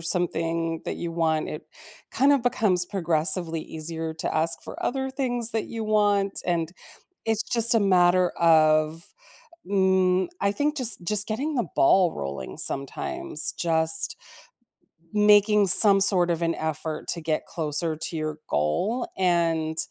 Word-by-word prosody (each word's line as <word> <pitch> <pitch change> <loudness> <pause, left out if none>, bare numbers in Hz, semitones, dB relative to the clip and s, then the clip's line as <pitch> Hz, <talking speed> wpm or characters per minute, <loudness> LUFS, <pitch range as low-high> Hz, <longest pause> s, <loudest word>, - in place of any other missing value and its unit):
something 165 -1 -2
that - - -4
you 170 - -5
want, 160 -2 -1
it 150 - -8 0.5
kinda 280 +1 +3
becomes 215 -8 +1
progressively 170 -2 -1
easier 160 +1 -5
to 160 - -4
ask 165 +1 0
for - - -10
other 265 +1 -2
things 245 -4 -2
that 225 -2 -2
you 225 -1 -6
want, 205 -2 0
and 170 -1 -2 0.5
it's 225 -1 -1
just 235 -2 +2
a 225 - +3
matter 180 -2 +3
of, 155 0 +2 0.6
mm, 190 - +1
I 200 - +1
think, 295 +5 -2
just 235 -9 +1
just 210 +3 0
getting 270 +9 -3
the 240 - -1
ball 180 +4 +3
rolling 70 -2 -7
sometimes, 340 - -2
just 160 -1 +2 1.0
making 210 0 +4
some 195 +2 +8
sort 185 -3 +4
of 170 -1 -2
an 165 0 0
effort 155 0 -5
to 170 - -2
get 155 -1 -2
closer 160 0 -2
to 165 +2 -5
your 155 -1 -4
goal 180 - -1
and 165 -3 0
175 Hz, 140 wpm, -24 LUFS, 160-210 Hz, 1.0 s, some